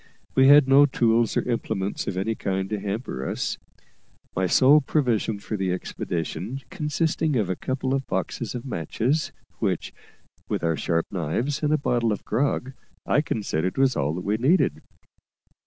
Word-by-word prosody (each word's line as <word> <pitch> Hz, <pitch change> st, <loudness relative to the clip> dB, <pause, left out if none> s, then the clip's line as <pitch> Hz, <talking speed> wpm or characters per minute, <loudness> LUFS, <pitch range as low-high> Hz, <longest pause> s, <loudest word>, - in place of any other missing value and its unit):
We 130 Hz, 0 st, +5 dB
had 145 Hz, -1 st, +8 dB
no 140 Hz, +2 st, +7 dB
tools 115 Hz, -3 st, +2 dB
or -, -, 0 dB
implements 110 Hz, -4 st, -2 dB
of 90 Hz, -, -3 dB
any 100 Hz, +4 st, 0 dB
kind 95 Hz, -3 st, -2 dB
to 105 Hz, -, -1 dB
hamper 100 Hz, -, -4 dB
us, -, -, -3 dB, 0.8 s
my 95 Hz, 0 st, +1 dB
sole 140 Hz, +9 st, +6 dB
provision 120 Hz, -7 st, 0 dB
for 105 Hz, +2 st, -5 dB
the 95 Hz, -2 st, -1 dB
expedition 90 Hz, +7 st, -4 dB
consisting 160 Hz, -2 st, 0 dB
of 105 Hz, -6 st, +1 dB
a -, -, -1 dB
couple 130 Hz, +5 st, -2 dB
of 135 Hz, -1 st, -1 dB
boxes 105 Hz, +6 st, -3 dB
of 125 Hz, -, -5 dB
matches, 125 Hz, -, -1 dB, 0.3 s
which, -, -, -1 dB, 0.6 s
with -, -, -2 dB
our 80 Hz, -1 st, +1 dB
sharp 85 Hz, +3 st, 0 dB
knives 100 Hz, -, -2 dB
and 150 Hz, -1 st, +1 dB
a 155 Hz, -, +4 dB
bottle 120 Hz, -5 st, +1 dB
of 105 Hz, -, -4 dB
grog, 135 Hz, -1 st, -1 dB, 0.3 s
I 145 Hz, -, +3 dB
considered 95 Hz, -, -2 dB
was 135 Hz, -1 st, +3 dB
all 75 Hz, +3 st, 0 dB
that 90 Hz, -, -5 dB
we 105 Hz, +2 st, +1 dB
needed. 140 Hz, +11 st, +2 dB
115 Hz, 165 wpm, -25 LUFS, 95-135 Hz, 0.8 s, had